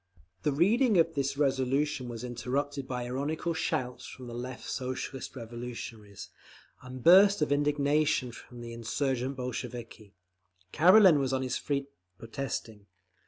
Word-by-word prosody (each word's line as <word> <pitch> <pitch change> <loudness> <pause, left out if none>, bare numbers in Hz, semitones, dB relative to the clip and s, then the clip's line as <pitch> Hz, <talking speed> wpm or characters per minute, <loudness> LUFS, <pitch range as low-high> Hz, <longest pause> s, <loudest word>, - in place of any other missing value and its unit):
The 150 - +1
reading 210 - +3
of 165 -1 +3
this 140 -1 -1
resolution 135 -1 0
was 115 0 -6
interrupted 130 +3 -3
by 125 -2 -3
ironical 145 +7 -2
shouts 125 -5 -2
from 130 - -10
the 120 - -8
Left 125 +1 -6
Socialist 130 +1 -4
Revolutionaries, 115 -3 -8 0.5
and 130 -1 -9
bursts 195 0 +7
of 150 - -2
indignation 145 -2 +2
from 120 0 -12
the 115 0 -7
insurgent 130 +3 -2
Bolsheviki. 120 -4 -6 0.6
Karelin 180 -1 +7
was 135 -1 0
on 130 0 0
his 130 -1 -2
feet, 140 -1 -2 0.3
protesting. 115 -2 -5
130 Hz, 130 wpm, -29 LUFS, 120-145 Hz, 0.6 s, bursts